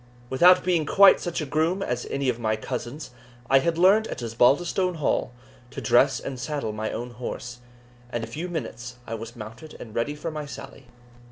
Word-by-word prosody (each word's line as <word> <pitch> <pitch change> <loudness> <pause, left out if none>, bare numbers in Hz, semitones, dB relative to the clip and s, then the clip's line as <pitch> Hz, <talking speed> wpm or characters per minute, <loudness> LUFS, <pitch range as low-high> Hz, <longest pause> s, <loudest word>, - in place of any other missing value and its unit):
Without 180 +7 +6
being 175 -3 +2
quite 200 +3 +7
such 175 -2 -3
a - - -2
groom 160 +7 0
as 125 -5 -3
any 140 -1 -2
of 120 -2 0
my 110 -2 0
cousins, 125 +5 -6 0.4
I 135 - +7
had 165 +3 0
learned 200 +5 +5
at - - -6
Osbaldistone 155 - +2
Hall 150 -4 0 0.4
to 135 - -7
dress 130 +1 +3
and 130 -2 -6
saddle 140 -5 -3
my 110 +1 -3
own 120 +1 -5
horse, 125 +1 -6 0.5
and 120 -2 -3
in - - -4
a - - -15
few 175 +4 -4
minutes 125 -6 -5
I 115 - -6
was 115 +2 -7
mounted 115 +7 -10
and 110 - -10
ready 120 +7 -1
for 160 +2 -5
my 150 -1 -5
sally. 135 -2 -10
135 Hz, 195 wpm, -25 LUFS, 120-165 Hz, 0.5 s, quite